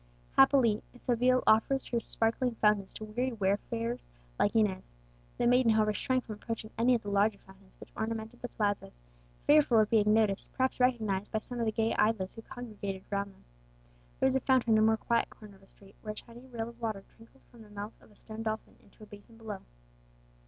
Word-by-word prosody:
Happily, 220 Hz, -, +5 dB, 0.2 s
Seville 250 Hz, +1 st, +2 dB
offers 225 Hz, +5 st, +4 dB
her 235 Hz, -, +1 dB
sparkling 230 Hz, +2 st, 0 dB
fountains 210 Hz, -3 st, +2 dB
to 215 Hz, -, -7 dB
weary 245 Hz, +4 st, -2 dB
wayfarers 230 Hz, +3 st, -2 dB, 0.3 s
like 205 Hz, -, +2 dB
Inez. 190 Hz, -, 0 dB, 0.4 s
The 240 Hz, -, 0 dB
maiden, 245 Hz, -1 st, +4 dB
however, 215 Hz, -1 st, +2 dB
shrank 255 Hz, +4 st, -1 dB
from 220 Hz, -, -6 dB
approaching 225 Hz, -1 st, -5 dB
any 245 Hz, +2 st, +3 dB
of 230 Hz, -, -3 dB
the 205 Hz, -, -4 dB
larger 200 Hz, +1 st, +2 dB
fountains 190 Hz, 0 st, -20 dB
which -, -, -13 dB
ornamented 225 Hz, +1 st, -4 dB
the 245 Hz, -, -3 dB
plazas, 205 Hz, -, -2 dB, 0.5 s
fearful 290 Hz, -5 st, +5 dB
of 215 Hz, -1 st, +3 dB
being 210 Hz, -2 st, +4 dB
noticed, 215 Hz, -2 st, +1 dB
perhaps 260 Hz, 0 st, 0 dB
recognized, 220 Hz, -6 st, +1 dB
by -, -, 0 dB
some 240 Hz, +3 st, -5 dB
of 230 Hz, -, 0 dB
the -, -, +2 dB
gay 225 Hz, +1 st, 0 dB
idlers 210 Hz, -4 st, +1 dB
who 225 Hz, -, -9 dB
congregated 205 Hz, -5 st, -7 dB
around 200 Hz, 0 st, -1 dB
them. 195 Hz, -, -23 dB, 0.8 s
There -, -, +2 dB
was 265 Hz, 0 st, +3 dB
a -, -, +4 dB
fountain 255 Hz, -3 st, +3 dB
in 215 Hz, -, +5 dB
a -, -, +4 dB
more 220 Hz, 0 st, +4 dB
quiet 235 Hz, +1 st, 0 dB
corner 210 Hz, -2 st, -14 dB
of -, -, -26 dB
a 195 Hz, -, -21 dB
street, 195 Hz, 0 st, -18 dB
where 215 Hz, -1 st, -5 dB
a -, -, -18 dB
tiny 240 Hz, +4 st, -11 dB
rill 230 Hz, -2 st, -5 dB
of 235 Hz, 0 st, -16 dB
water 215 Hz, -4 st, -3 dB
trickled 230 Hz, +4 st, -20 dB
from 235 Hz, -, -15 dB
the 215 Hz, -, -14 dB
mouth 205 Hz, +1 st, -7 dB
of -, -, -20 dB
a 210 Hz, -, -22 dB
stone 220 Hz, +1 st, -8 dB
dolphin 220 Hz, -1 st, -4 dB
into 205 Hz, -, -19 dB
a -, -, -9 dB
basin 210 Hz, +2 st, -15 dB
below. 215 Hz, -3 st, -6 dB
220 Hz, 210 wpm, -31 LUFS, 205-235 Hz, 0.8 s, Happily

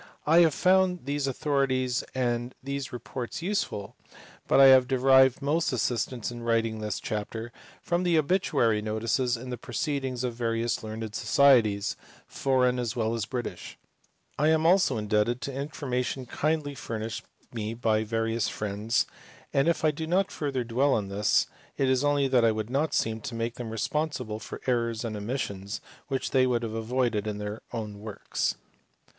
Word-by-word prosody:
I 160 Hz, +3 st, +6 dB
have 165 Hz, -3 st, +5 dB
found 185 Hz, -3 st, +3 dB
these 140 Hz, 0 st, -1 dB
authorities 135 Hz, -3 st, 0 dB
and 120 Hz, -1 st, -1 dB
these 140 Hz, -1 st, -4 dB
reports 125 Hz, +4 st, -6 dB
useful, 180 Hz, -, -2 dB, 0.5 s
but -, -, +4 dB
I 135 Hz, -, +9 dB
have 130 Hz, -1 st, +7 dB
derived 130 Hz, 0 st, +5 dB
most 160 Hz, +4 st, +1 dB
assistance 120 Hz, 0 st, -1 dB
in 120 Hz, 0 st, -7 dB
writing 115 Hz, -1 st, 0 dB
this 105 Hz, -2 st, -3 dB
chapter 110 Hz, +2 st, -4 dB, 0.3 s
from 175 Hz, 0 st, 0 dB
the 175 Hz, -2 st, +2 dB
obituary 140 Hz, -, +2 dB
notices 115 Hz, +3 st, 0 dB
in 125 Hz, +2 st, -7 dB
the 125 Hz, -, -4 dB
proceedings 130 Hz, 0 st, -2 dB
of 125 Hz, -2 st, -1 dB
various 115 Hz, 0 st, -1 dB
learned 110 Hz, 0 st, -6 dB
Societies, 115 Hz, -7 st, +4 dB, 0.3 s
foreign 125 Hz, -2 st, +1 dB
as 120 Hz, -3 st, -2 dB
well 115 Hz, -1 st, 0 dB
as 115 Hz, -2 st, -2 dB
British; 120 Hz, -8 st, -5 dB, 0.6 s
I 150 Hz, -, +3 dB
am 160 Hz, 0 st, +3 dB
also 175 Hz, -7 st, +4 dB
in 105 Hz, -1 st, -4 dB
debted 105 Hz, +4 st, +2 dB
to 140 Hz, +4 st, -4 dB
information 135 Hz, -2 st, -3 dB
kindly 150 Hz, +3 st, -1 dB
furnished 115 Hz, -4 st, -5 dB, 0.3 s
me 110 Hz, -1 st, -3 dB
by 110 Hz, -2 st, +1 dB
various 115 Hz, 0 st, -1 dB
friends, 105 Hz, +2 st, -1 dB, 0.5 s
and 140 Hz, +3 st, +3 dB
if 170 Hz, -1 st, +1 dB
I 155 Hz, -, +5 dB
do 160 Hz, +2 st, -5 dB
not 190 Hz, +3 st, +1 dB
further 140 Hz, -4 st, -2 dB
dwell 130 Hz, +4 st, +2 dB
on 100 Hz, -2 st, -2 dB
this, 105 Hz, +1 st, +2 dB, 0.3 s
it 135 Hz, -, +2 dB
is 130 Hz, +1 st, +2 dB
only 145 Hz, -1 st, +2 dB
that 130 Hz, -3 st, +3 dB
I 115 Hz, -, +5 dB
would 110 Hz, +1 st, -4 dB
not 145 Hz, +2 st, +1 dB
seem 110 Hz, 0 st, 0 dB
to 130 Hz, -4 st, -6 dB
make 115 Hz, 0 st, -2 dB
them 120 Hz, -2 st, -6 dB
responsible 125 Hz, -1 st, -2 dB
for -, -, -8 dB
errors 115 Hz, -2 st, 0 dB
and 110 Hz, -2 st, -3 dB
omissions 100 Hz, -2 st, -4 dB, 0.3 s
which 135 Hz, -2 st, -2 dB
they 130 Hz, -1 st, +4 dB
would 120 Hz, -2 st, 0 dB
have 110 Hz, -1 st, -3 dB
avoided 115 Hz, -1 st, 0 dB
in 105 Hz, -1 st, -3 dB
their 105 Hz, +1 st, -5 dB
own 105 Hz, -3 st, -5 dB
works. 105 Hz, -1 st, -2 dB
125 Hz, 170 wpm, -28 LUFS, 110-140 Hz, 0.6 s, I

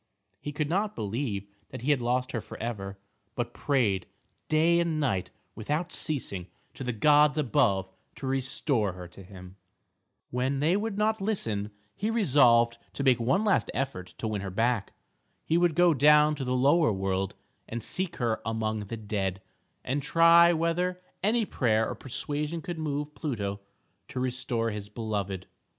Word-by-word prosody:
He 145 Hz, -, -5 dB
could 145 Hz, 0 st, -2 dB
not 205 Hz, +6 st, 0 dB
believe 105 Hz, -1 st, -3 dB, 0.2 s
that -, -, -8 dB
he 145 Hz, -, +2 dB
had 140 Hz, -4 st, +2 dB
lost 125 Hz, +2 st, 0 dB
her 120 Hz, -, -2 dB
for -, -, -10 dB
ever, 100 Hz, -4 st, -5 dB, 0.4 s
but 120 Hz, -1 st, -3 dB
prayed 110 Hz, -10 st, +1 dB, 0.4 s
day 165 Hz, +2 st, +4 dB
and 165 Hz, -2 st, 0 dB
night 110 Hz, -11 st, 0 dB, 0.2 s
without 150 Hz, +10 st, -2 dB
ceasing 105 Hz, -, -2 dB, 0.3 s
to -, -, -7 dB
the 125 Hz, -, -1 dB
gods 150 Hz, +6 st, +4 dB
above 100 Hz, -8 st, +2 dB, 0.3 s
to -, -, -7 dB
restore 130 Hz, -, 0 dB
her 90 Hz, -1 st, -9 dB
to 90 Hz, +3 st, -13 dB
him. 95 Hz, 0 st, -12 dB, 0.7 s
When 130 Hz, +3 st, 0 dB
they 160 Hz, +6 st, +3 dB
would 205 Hz, 0 st, -2 dB
not 215 Hz, 0 st, +1 dB
listen, 115 Hz, -, -1 dB, 0.3 s
he 210 Hz, -, -2 dB
resolved 125 Hz, -, +4 dB
to 140 Hz, -, -3 dB
make 130 Hz, -3 st, +4 dB
one 130 Hz, -, +2 dB
last 205 Hz, -3 st, +2 dB
effort 130 Hz, -10 st, -3 dB
to 110 Hz, -, -3 dB
win 105 Hz, -2 st, -2 dB
her 100 Hz, -, -4 dB
back. 115 Hz, +2 st, 0 dB, 0.5 s
He 160 Hz, -, +1 dB
would 175 Hz, -3 st, +2 dB
go 175 Hz, -1 st, +5 dB
down 150 Hz, +2 st, +6 dB
to 145 Hz, -2 st, -4 dB
the 125 Hz, 0 st, -1 dB
Lower 140 Hz, +2 st, +4 dB
World 95 Hz, -1 st, -1 dB, 0.3 s
and 115 Hz, -1 st, -4 dB
seek 185 Hz, +4 st, -2 dB
her 115 Hz, -3 st, -1 dB
among 110 Hz, -1 st, -2 dB
the 115 Hz, -, -5 dB
dead, 100 Hz, -3 st, -2 dB, 0.4 s
and 140 Hz, +3 st, -1 dB
try 170 Hz, +3 st, +6 dB
whether 175 Hz, +2 st, 0 dB, 0.2 s
any 225 Hz, +3 st, +2 dB
prayer 110 Hz, -, +1 dB
or -, -, -3 dB
persuasion 150 Hz, +5 st, -3 dB
could 175 Hz, -3 st, -5 dB
move 150 Hz, -1 st, -3 dB
Pluto 105 Hz, -11 st, -3 dB, 0.5 s
to 130 Hz, -, -5 dB
restore 125 Hz, -2 st, -1 dB
his 105 Hz, -1 st, -6 dB
beloved. 100 Hz, -4 st, -3 dB
130 Hz, 165 wpm, -28 LUFS, 110-155 Hz, 0.7 s, down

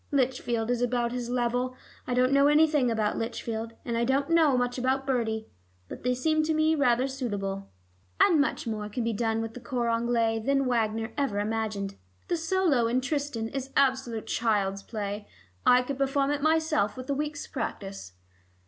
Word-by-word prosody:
Lichfield 245 Hz, -4 st, 0 dB
is 245 Hz, -1 st, 0 dB
about 240 Hz, -1 st, +1 dB
his 245 Hz, -1 st, -4 dB
level. 245 Hz, +1 st, 0 dB, 0.3 s
I 245 Hz, -, 0 dB
don't 255 Hz, +1 st, +3 dB
know 280 Hz, +1 st, +5 dB
anything 295 Hz, -3 st, +4 dB
about 220 Hz, -2 st, 0 dB
Lichfield, 225 Hz, 0 st, -4 dB
and 235 Hz, -, -2 dB
I 230 Hz, -, +1 dB
don't 275 Hz, +5 st, +1 dB
know 315 Hz, -6 st, +5 dB
much 245 Hz, 0 st, -1 dB
about 265 Hz, +2 st, 0 dB
Bertie. 225 Hz, -4 st, -1 dB, 0.4 s
But -, -, -8 dB
they 250 Hz, +1 st, +1 dB
seem 310 Hz, +5 st, +2 dB
to 315 Hz, 0 st, +1 dB
me 310 Hz, +1 st, +3 dB
rather 255 Hz, -4 st, +2 dB
suitable. 200 Hz, -7 st, -4 dB, 0.5 s
And 320 Hz, -4 st, +5 dB
much 285 Hz, -, -1 dB
more 215 Hz, -2 st, -3 dB
can 235 Hz, +3 st, -3 dB
be 230 Hz, 0 st, 0 dB
done 225 Hz, +1 st, 0 dB
with 225 Hz, 0 st, -5 dB
the 250 Hz, -, -8 dB
cor 240 Hz, -1 st, -2 dB
anglais 230 Hz, -1 st, +1 dB
than 275 Hz, +4 st, +1 dB
Wagner 225 Hz, -2 st, 0 dB
ever 225 Hz, -8 st, 0 dB
imagined. 210 Hz, -2 st, -2 dB, 0.3 s
The 350 Hz, -, +2 dB
solo 330 Hz, -7 st, +2 dB
in 240 Hz, +2 st, +2 dB
Tristan 275 Hz, -5 st, -2 dB
is 270 Hz, +1 st, -4 dB
absolute 260 Hz, -5 st, +1 dB
child's 200 Hz, -4 st, 0 dB
play. 205 Hz, -1 st, -5 dB, 0.4 s
I 250 Hz, 0 st, +6 dB
could 275 Hz, +1 st, -5 dB
perform 275 Hz, +1 st, +1 dB
it 290 Hz, -1 st, -1 dB
myself 310 Hz, -8 st, +2 dB
with 255 Hz, 0 st, -7 dB
a 280 Hz, -, 0 dB
week's 295 Hz, +1 st, -3 dB
practice." 195 Hz, -, -5 dB
245 Hz, 180 wpm, -28 LUFS, 225-275 Hz, 0.5 s, I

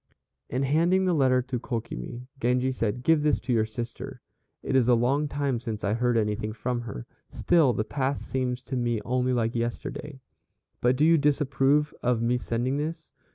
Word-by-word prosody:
In 130 Hz, +3 st, -1 dB
handing 170 Hz, +7 st, +3 dB
the 180 Hz, -, +2 dB
letter 130 Hz, -4 st, +3 dB
to 130 Hz, -1 st, -3 dB
Kokimi, 115 Hz, -, -5 dB
Genji 125 Hz, +2 st, +1 dB
said, 120 Hz, -1 st, -2 dB
"Give 160 Hz, 0 st, +4 dB
this 150 Hz, -1 st, +2 dB
to 125 Hz, +1 st, -1 dB
your 110 Hz, -2 st, +2 dB
sister; 115 Hz, +2 st, -6 dB, 0.4 s
it -, -, -1 dB
is 125 Hz, -3 st, +4 dB
a 125 Hz, -, +6 dB
long 135 Hz, +6 st, +1 dB
time 140 Hz, -4 st, -1 dB
since 115 Hz, -3 st, -5 dB
I 100 Hz, -, +1 dB
heard 120 Hz, +1 st, +1 dB
anything 105 Hz, 0 st, -1 dB
from 120 Hz, +2 st, -2 dB
her, 105 Hz, -, -7 dB, 0.2 s
still 165 Hz, -7 st, +3 dB
the 110 Hz, -, -1 dB
past 135 Hz, +4 st, -2 dB
seems 125 Hz, -1 st, -2 dB
to 130 Hz, -, -5 dB
me 120 Hz, -2 st, 0 dB
only 125 Hz, +1 st, +1 dB
like 115 Hz, -2 st, 0 dB
yesterday. 120 Hz, +4 st, -4 dB, 0.6 s
But 125 Hz, +1 st, +3 dB
do 145 Hz, +4 st, +3 dB
you 165 Hz, 0 st, +5 dB
disapprove 145 Hz, 0 st, +2 dB
of 125 Hz, -1 st, +1 dB
my 120 Hz, +1 st, +2 dB
sending 125 Hz, +3 st, -1 dB
this?" 160 Hz, +2 st, -5 dB
125 Hz, 185 wpm, -27 LUFS, 120-140 Hz, 0.6 s, a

